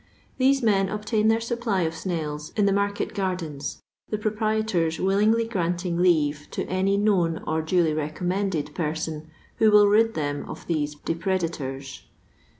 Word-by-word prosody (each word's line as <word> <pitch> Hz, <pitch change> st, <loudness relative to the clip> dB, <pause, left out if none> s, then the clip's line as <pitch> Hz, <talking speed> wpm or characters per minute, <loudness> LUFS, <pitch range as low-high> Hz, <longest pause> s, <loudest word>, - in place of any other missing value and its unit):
Thsis 270 Hz, 0 st, +3 dB
men 195 Hz, -4 st, +3 dB
obtain 210 Hz, +1 st, 0 dB
their 225 Hz, +1 st, +4 dB
supply 230 Hz, -5 st, -1 dB
of 160 Hz, 0 st, -1 dB
snails 155 Hz, -3 st, -4 dB
in 210 Hz, -, +3 dB
the 200 Hz, -, +3 dB
markel 200 Hz, 0 st, 0 dB
gardens, 180 Hz, -8 st, -4 dB, 0.3 s
the 215 Hz, -, -1 dB
proprietors 215 Hz, -6 st, 0 dB
willingly 210 Hz, +4 st, +2 dB
gimnting 175 Hz, -4 st, -1 dB
leave 150 Hz, -5 st, +2 dB
te -, -, -3 dB
any 190 Hz, +2 st, +1 dB
known 185 Hz, -6 st, +2 dB
or 160 Hz, 0 st, 0 dB
duly 160 Hz, 0 st, +2 dB
recommended 155 Hz, +1 st, -2 dB
person 155 Hz, 0 st, -3 dB, 0.3 s
who 220 Hz, -, +5 dB
will 210 Hz, -1 st, +7 dB
rid 225 Hz, +2 st, +3 dB
them 145 Hz, -2 st, -2 dB
of -, -, -8 dB
these 150 Hz, -3 st, -1 dB
depredators. 160 Hz, -6 st, -3 dB
185 Hz, 145 wpm, -25 LUFS, 160-210 Hz, 0.3 s, will